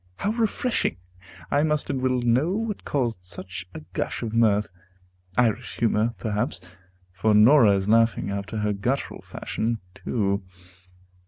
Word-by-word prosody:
how 205 - -1
refreshing! 230 - 0 0.5
I 145 - +3
must 150 -1 0
and 130 - -2
will 130 -1 +1
know 130 +9 +2
what 220 0 -3
caused 120 -9 -1
such 90 +1 -6
a - - -6
gush 100 - -2
of 110 -1 -4
mirth. 105 -3 +3 0.7
Irish 120 -1 +1
humor, 115 0 +1
perhaps, 105 -2 -2 0.5
for 105 +3 +2
Norah 110 -1 +7
is 95 0 -1
laughing, 115 -3 +3
after 100 +2 -4
her 105 0 +1
guttural 125 +8 -2
fashion, 115 0 -3
too. 100 -2 -1
115 Hz, 140 wpm, -25 LUFS, 105-130 Hz, 0.7 s, Norah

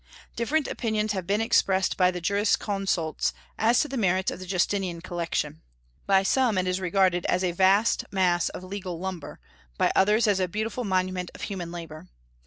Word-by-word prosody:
Different 285 +6 0
opinions 215 -2 -1
have 190 -4 -3
been 205 +2 +1
expressed 190 -4 +2
by 180 -1 +4
the 180 -1 -4
jurisconsults 195 -3 0 0.3
as 230 +3 +4
to - - -1
the 275 - -5
merits 190 -3 +1
of - - -7
the 185 - -8
Justinian 185 -1 0
collection. 165 -3 -3 0.5
By 195 -1 +4
some 235 +1 +2
it 185 - +1
is 185 0 0
regarded 185 -1 +2
as 180 - +1
a 180 - +1
vast 195 +5 +3
mass 180 -3 +2
of - - -8
legal 185 -2 -5
lumber; 180 -3 -6 0.4
by - - +2
others, 210 +4 +4
as 205 -3 +2
a 185 - +1
beautiful 220 +6 -3
monument 185 -2 -1
of - - -10
human 180 -5 -5
labor. 160 - -8
190 Hz, 180 wpm, -26 LUFS, 180-205 Hz, 0.5 s, by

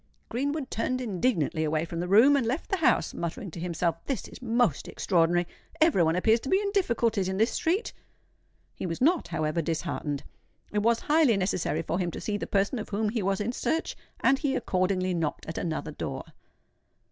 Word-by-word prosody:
Greenwood 280 +3 -2
turned 255 +3 -1
indignantly 185 - 0
away 155 +1 0
from 165 0 -5
the 175 - -2
room, 230 +10 +6
and 275 - +2
left 265 +8 -2
the 390 - +2
house, 310 - +2
muttering 170 +3 -4
to 170 - -8
himself, 170 -1 -1
"This 270 - -3
is - - -12
most 235 - +1
extraordinary! 175 -1 +2 0.3
Every 315 - +4
one 160 0 +3
appears 220 +5 +3
to 265 - -6
be 380 - +4
in 405 -1 -1
difficulties 235 - +1
in 190 - -2
this 225 +3 +3
street." 370 +8 0 0.8
He - - -5
was 165 -1 -4
not, 330 +6 +3
however, 155 +2 -1
disheartened: 160 -3 -3 0.5
it 210 - +2
was 230 +2 +2
highly 295 -8 +4
necessary 185 -4 0
for 170 - -2
him 175 -2 0
to - - -6
see 210 - -2
the 205 - -3
person 200 +5 +1
of 215 - -6
whom 210 +1 0
he 225 0 -1
was 195 0 0
in 210 +3 -1
search; 320 +6 -1 0.3
and 270 +1 +4
he 280 -3 0
accordingly 185 -3 0
knocked 165 -3 -2
at 160 - -4
another 160 -2 -3
door. - - -5
205 Hz, 195 wpm, -28 LUFS, 170-255 Hz, 0.8 s, room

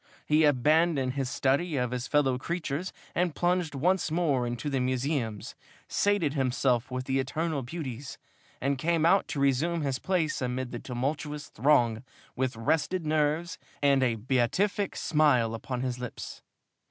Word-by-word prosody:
He 155 +1 +4
abandoned 145 0 +3
this 135 -2 -2
study 140 +5 +1
of 125 -1 0
his 125 0 -3
fellow 135 -4 +2
creatures 170 +2 -3 0.2
and 175 -3 0
plunged 175 -4 0
once 175 +5 +1
more 150 -7 +1
into 120 +3 -4
the 140 -2 0
museums, 125 -4 -2 0.3
sated 200 -8 +1
himself 130 -3 +1
with 130 0 -3
the 135 0 0
eternal 155 +2 -1
beauties, 130 -2 -6 0.4
and 135 0 -1
came 165 +1 +1
out 195 +3 +4
to 145 - -4
resume 145 +5 +1
his 135 -2 -1
place 175 -7 0
amid 125 0 -2
the 120 - -5
tumultuous 145 +4 -3
throng 120 -3 +2 0.3
with 130 -1 -1
rested 160 +9 0
nerves 155 +2 0 0.2
and 140 -1 +4
a 120 -3 +2
beatific 130 - 0
smile 135 -8 +2
upon 125 +2 -4
his 125 -1 -2
lips. 125 -1 -7
140 Hz, 150 wpm, -28 LUFS, 125-160 Hz, 0.4 s, He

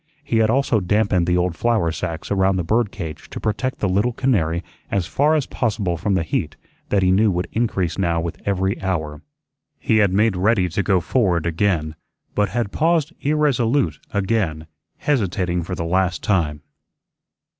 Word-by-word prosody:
He 120 -5 0
had 110 -1 +3
also 125 -2 +2
dampened 95 -2 +1
the 90 0 +2
old 90 -1 0
flour 110 -4 +1
sacks 85 +2 -5
around 95 -1 +2
the 90 - -1
bird 110 +4 +1
cage 85 -5 -7
to - - -6
protect 120 +5 -2
the 100 - 0
little 100 +6 +1
canary 90 -10 0 0.3
as 95 -3 0
far 150 - +2
as 150 -4 +1
possible 105 -7 -1
from 95 +4 -1
the 90 - +1
heat 80 - -2 0.3
that 100 -2 +2
he 90 - +3
knew 105 +3 +4
would 90 -1 -1
increase 100 -7 -1
now 85 -3 +1
with 85 0 -5
every 95 -1 -1
hour. 80 -6 -2 0.6
He 110 - +1
had 100 -3 +4
made 105 +1 +2
ready 95 0 +2
to 85 - -1
go 95 -2 +2
forward 90 -5 +1
again, 85 -3 0 0.4
but 105 -1 +1
had 120 -4 -2
paused 165 0 +1
irresolute 140 -3 +1
again, 95 -6 -1 0.3
hesitating 95 -10 0
for 90 +2 -4
the 85 - -3
last 90 +1 0
time. 75 -7 0
95 Hz, 175 wpm, -21 LUFS, 85-110 Hz, 0.6 s, knew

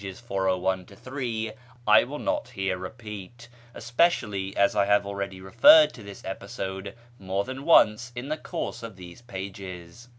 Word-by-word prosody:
401 95 -2 -1
3), 115 0 -4 0.3
I 105 +1 +7
will 145 +4 -6
not 300 - -1
here 95 -1 -2
repeat, 105 +3 -9 0.3
especially 110 - 0
as 100 - +3
I 100 - +3
have 100 0 +3
already 100 -1 -4
referred 295 - +7
to 120 - -12
this 100 -1 -11
episode 95 +1 -5 0.2
more 95 +1 -1
than 130 +4 -7
once 120 -7 +5
in 120 +2 -5
the 155 - -1
course 170 +1 -5
of 115 -3 -8
these 90 +3 -12
pages. 95 -1 -8
100 Hz, 145 wpm, -26 LUFS, 95-120 Hz, 0.3 s, I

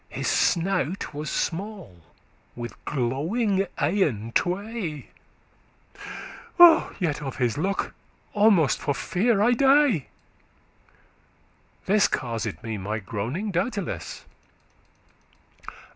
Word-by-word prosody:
His - - -4
snout 180 -1 0
was 150 0 -4
small, 190 - -4 0.6
with 120 0 -6
glowing 185 - 0
eyen 145 - 0
tway; 185 - -2 1.9
Yet 155 -6 -1
of 135 -2 -5
his 120 -4 0
look 195 +6 -2 0.4
almost 205 - +4
for 145 - -1
fear 200 - +1
I 240 - +4
dey;* - - +3 0.4
*died 155 - -2 1.8
This 205 +1 +4
caused 115 -5 -3
me 110 -2 -4
my 105 +3 -3
groaning, 115 - -4
doubteless." 175 - -3
165 Hz, 90 wpm, -25 LUFS, 125-200 Hz, 1.9 s, almost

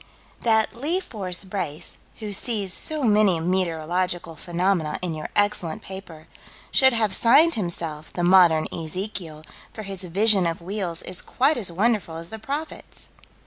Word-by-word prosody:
That 220 -1 +2
"Lee 305 +10 +1
Fore 210 - -7 0.2
Brace," 175 -6 -4 0.2
"who 210 -2 -5
sees 200 -3 +1
'so 310 +6 +1
many 210 -6 +4
meteorological 175 0 -1
phenomena 175 -1 -1
in 175 -3 -1
your 155 -1 -6
excellent 205 -6 0
paper,' 180 -5 -9 0.5
should 265 -1 +5
have 220 -4 +1
signed 290 - +5
himself 165 -6 -4
'The 175 - -3
Modern 175 -3 +5
Ezekiel,' 165 -1 -5 0.3
for 215 - -7
his 195 -2 -3
vision 195 +1 +3
of 165 - -3
wheels 180 -2 -3
is 185 - 0
quite 285 +4 +1
as 195 -6 -1
wonderful 200 -2 0
as 165 +1 -7
the 220 - -7
prophet's." 290 +7 -7
190 Hz, 145 wpm, -24 LUFS, 170-215 Hz, 0.5 s, should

